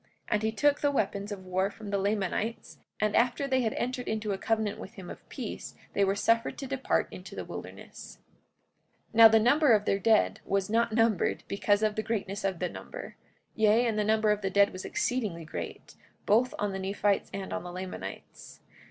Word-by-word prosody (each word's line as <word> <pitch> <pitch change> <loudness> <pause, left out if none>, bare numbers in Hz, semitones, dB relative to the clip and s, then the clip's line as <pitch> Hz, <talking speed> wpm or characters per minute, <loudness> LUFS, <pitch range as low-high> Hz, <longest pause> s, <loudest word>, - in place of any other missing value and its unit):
And 210 - +1
he 220 0 0
took 290 +6 +2
the 290 - +3
weapons 205 -6 -1
of 190 -2 -6
war 185 +1 0
from 205 0 -9
the 200 - +1
Lamanites; 205 +3 -2 0.2
and 215 -1 +1
after 245 +4 +2
they 260 -1 +2
had 225 -3 0
entered 250 0 -3
into 215 -1 -2
a 195 - -1
covenant 220 -1 -1
with 195 - -9
him 185 -3 -8
of - - -13
peace 245 -6 -6 0.2
they 200 - +2
were 195 0 +2
suffered 230 +3 +1
to 275 - -5
depart 270 0 0
into - - -10
the - - -5
wilderness. - - -9 0.9
44:21 - - -19
Now 225 - +12
the 225 0 +5
number 265 +4 +5
of 210 -1 +3
their 195 - +1
dead 220 +1 +3
was 195 0 -1
not 230 0 +2
numbered 225 -4 +1
because 205 +1 +1
of 215 -1 +2
the 215 - 0
greatness 210 -2 -3
of 195 -2 0
the 180 - -1
number; - - -9 0.4
yea, 220 +2 +3
the 215 -1 0
number 215 0 +3
of 210 0 0
their 195 - -1
dead 200 +1 +4
was 185 - -7
exceedingly 210 -10 -2
great, 85 - -7 0.3
both 235 +5 +3
on 205 -1 -1
the 190 - -4
Nephites 200 +1 0
and 195 -1 -5
on - - -2
the 180 - -8
Lamanites. 185 +1 -8
210 Hz, 205 wpm, -29 LUFS, 195-230 Hz, 0.9 s, Now